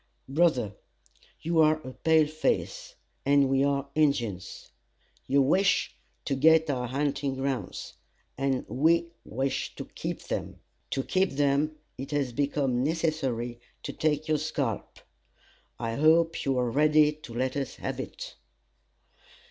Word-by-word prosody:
"Brother, 135 - +2 0.7
you 165 0 +1
are 155 0 +5
a 130 - -8
pale 160 +1 +3
face, 155 +1 -2 0.3
and 140 0 +4
we 135 0 +3
are 140 0 0
Injins. 120 -11 -1 0.6
You 140 0 +4
wish 190 +8 +2 0.3
to - - -1
get 160 +3 +4
our 125 -2 -2
hunting 140 +1 -1
grounds, 135 -1 -3 0.4
and 135 -1 -1
we 170 +4 +2
wish 135 +4 -2
to - - -6
keep - - -6
them. - - -4 0.3
To 135 - -1
keep 190 +5 +1
them, 145 +2 +1 0.2
it 135 +1 -5
has 140 -4 -1
become 135 -2 0
necessary 135 -7 -1 0.2
to - - -5
take 155 0 0
your 155 -1 +2
scalp. 140 -7 -3 0.8
I 115 -1 -3
hope 165 +2 +3
you 135 -2 +1
are 125 -1 +1
ready 150 +2 +4
to 150 -6 -12
let 130 +1 -1
us 140 -3 -3
have - - -5
it." - - -7
140 Hz, 135 wpm, -28 LUFS, 130-155 Hz, 0.8 s, are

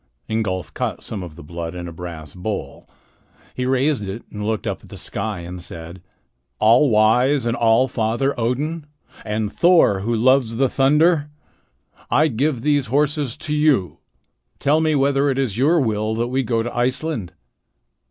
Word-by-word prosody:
Ingolf 105 -5 -2
caught - - -3
some 105 - -5
of 85 -4 -8
the 85 - -11
blood 85 +2 -6
in 90 -1 -6
a - - -7
brass 80 -3 -8
bowl. 100 +3 -6 0.6
He 125 0 -2
raised 130 -4 +1
it 100 +5 -6
and 105 0 -6
looked 110 0 -2
up - - -3
at - - -17
the - - -9
sky 100 -2 -4
and 90 +1 -8
said: 85 +1 -8 0.6
"All 120 +6 +5
wise 120 +5 +3
and 115 0 0
all 115 +3 +3
father 120 +4 0
Odin, 145 +7 -2 0.4
and 105 -1 -2
Thor 170 - +4
who 115 +4 -1
loves 125 0 +3
the 130 +2 +2
thunder, 150 +3 +3 0.8
I 155 +1 +3
give 130 0 -1
these 145 -3 +2
horses 145 0 0
to 150 - -4
you. 145 - +2 0.6
Tell 150 +3 +2
me 155 -1 +2
whether 140 0 +2
it 135 - -1
is 130 -7 -1
your 160 +6 +4
will 110 -4 0
that 120 +2 -1
we 130 +1 0
go 115 -2 0
to 120 - -6
Iceland." 125 - -1
120 Hz, 170 wpm, -21 LUFS, 105-140 Hz, 0.8 s, All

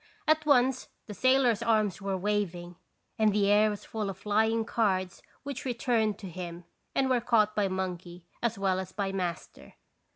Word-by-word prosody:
At 310 0 +2
once 260 -2 +3 0.2
the 210 - -8
sailor's 255 -1 +3
arms 215 -4 +1
were 195 -1 -2
waving, 180 -3 -2 0.4
and 215 -1 +4
the 200 0 +2
air 210 +1 +5
was 205 -1 -6
full 215 -3 -3
of 195 - -6
flying 220 +2 +1
cards 190 -6 -1 0.2
which 280 0 -5
returned 235 -4 0
to 195 - -8
him 175 -1 -7 0.3
and 270 - +2
were 255 -2 +2
caught 215 -3 +2
by 205 -2 +2
monkey 180 -2 -5 0.2
as 230 -2 -1
well 190 -1 +1
as 190 0 -6
by 195 -2 -2
master. 180 -3 -5
210 Hz, 170 wpm, -29 LUFS, 190-235 Hz, 0.4 s, air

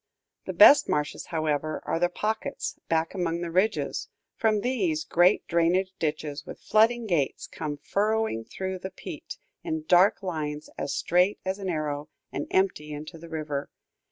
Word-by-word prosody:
The - - -4
best 285 - +8
marshes, 150 0 -1
however, 155 -2 -1
are 165 - 0
the 175 0 +3
pockets, 215 +4 -3
back 165 0 +1
among 170 -3 -1
the 170 -1 -3
ridges; 190 +6 0 0.3
from 215 -3 +2
these, 190 -11 0
great 175 +5 +3
drainage 175 +3 +2
ditches, 150 -2 -2
with - - -9
flooding 230 +2 +3
gates, 165 -9 0
come 150 -2 -5
furrowing 210 - 0
through 190 +5 -4
the 190 - -5
peat, - - -8 0.3
in 320 -2 -3
dark 185 +4 +5
lines 155 -4 -4
as 140 - -3
straight 180 +4 +2
as 190 +1 -2
an 195 -2 -3
arrow, 150 -2 -2 0.2
and - - -4
empty 185 -6 +1
into 155 +3 -7
the 170 +1 -11
river. 150 -3 -3
170 Hz, 155 wpm, -27 LUFS, 155-195 Hz, 0.3 s, best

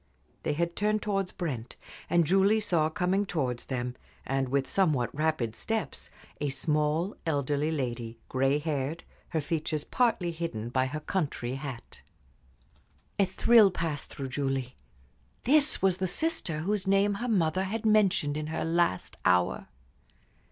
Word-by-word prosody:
They - - -1
had 170 +3 -1
turned 210 +1 +1
towards 195 -3 -1
Brent, 130 -9 -4 0.3
and 170 -1 +4
Julie 195 +6 +4
saw 170 -7 +1
coming 180 +4 +1
towards 135 -11 -2
them, 125 -1 -3 0.3
with 135 0 0
somewhat 145 - +1
rapid 150 -7 0
steps, 220 -1 -2 0.3
a 145 - -1
small, 150 +5 0
elderly 145 -1 0
lady, 120 -6 -3
gray 135 +2 +2
haired, 150 0 -2 0.3
her 160 - 0
features 155 0 -2
partly 225 -8 +1
hidden 160 -10 -4
by 130 +1 +1
her 155 +3 -5
country 145 -9 -2
hat. 135 -3 -7 1.2
A 200 - +5
thrill 215 +3 +5
passed 165 -5 -3
through 135 -1 -6
Julie. 135 -2 -2 0.7
This 290 -4 +3
was 190 -2 +4
the 185 - -1
sister 180 - -1
whose 195 +2 -1
name 195 +1 +3
her 245 - -1
mother 185 -3 +2
had 220 +3 -3
mentioned 195 -9 +3
in 155 0 -3
her 160 0 -2
last 165 - 0
hour. 90 -1 +2
160 Hz, 140 wpm, -29 LUFS, 135-190 Hz, 1.2 s, A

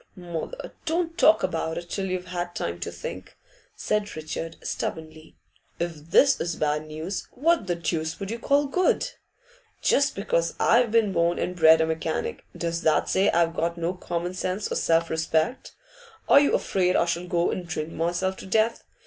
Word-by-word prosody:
'Mother, 175 - -6
don't 330 0 0
talk 320 -2 +5
about 160 0 -1
it 175 - -6
till 195 +2 -3
you've 185 -1 -3
had 175 -1 -4
time 85 0 -3
to 85 - -4
think,' 85 +1 -8 0.4
said 210 -1 -1
Richard, 160 +1 -5
stubbornly. 155 0 -5 0.4
'If 165 -2 -4
this 275 +6 +5
is 170 -1 -2
bad 150 0 -1
news, 160 +4 -5
what 320 - +2
the 175 - 0
deuce 160 -1 -2
would 195 +1 -4
you 230 - -4
call 285 +4 +2
good? 365 - +1 0.7
Just 280 0 +2
because 170 -4 0
I've 235 0 +4
been 220 -3 +2
born 170 0 +2
and 180 - -2
bred 160 -1 +6
a - - +3
mechanic, 160 0 -3
does 170 0 -2
that 160 - +2
say 195 +2 +3
I've 170 -1 +2
got 170 +1 -1
no 170 +1 -1
common 175 -1 -4
sense 185 +2 -3
or - - 0
self 165 0 +2
respect? 160 +8 -1 0.5
Are - - +8
you 285 - +3
afraid 180 -1 +1
I - - +3
shall 175 +1 -2
go 175 -1 +1
and 180 -2 -4
drink 160 -1 -4
myself 175 +4 -1
to - - -9
death? 220 +3 +1
175 Hz, 180 wpm, -25 LUFS, 160-200 Hz, 0.7 s, Are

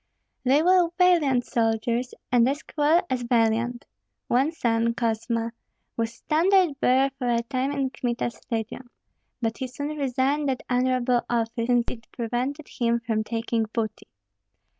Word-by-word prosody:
They 275 +4 +4
were 360 -1 +4
valiant 315 -9 +4
soldiers, 230 +2 0 0.2
and 245 0 +4
as 285 +2 -3
cruel 310 +3 +2
as 255 -4 -1
valiant. 235 0 +1 0.4
One 265 +6 +3
son, 230 -6 0
Kosma, 230 0 -1 0.4
was 230 -1 -1
standard 325 +4 +2
bearer 265 +2 +3
for 250 -2 -1
a 235 -1 +1
time 260 +2 -1
in 275 -2 -1
Kmita's 240 -1 -3
legion; 230 +2 -4 0.5
but 225 0 -1
he 260 - -2
soon 285 +4 -5
resigned 275 +1 0
that 260 - -2
honorable 250 -1 +2
office, 230 0 -1
since 245 -1 +3
it 230 -2 -11
prevented 250 +5 -3
him 235 -1 0
from 225 -2 -1
taking 230 0 -1
booty. 220 -3 -3
245 Hz, 140 wpm, -25 LUFS, 230-275 Hz, 0.5 s, They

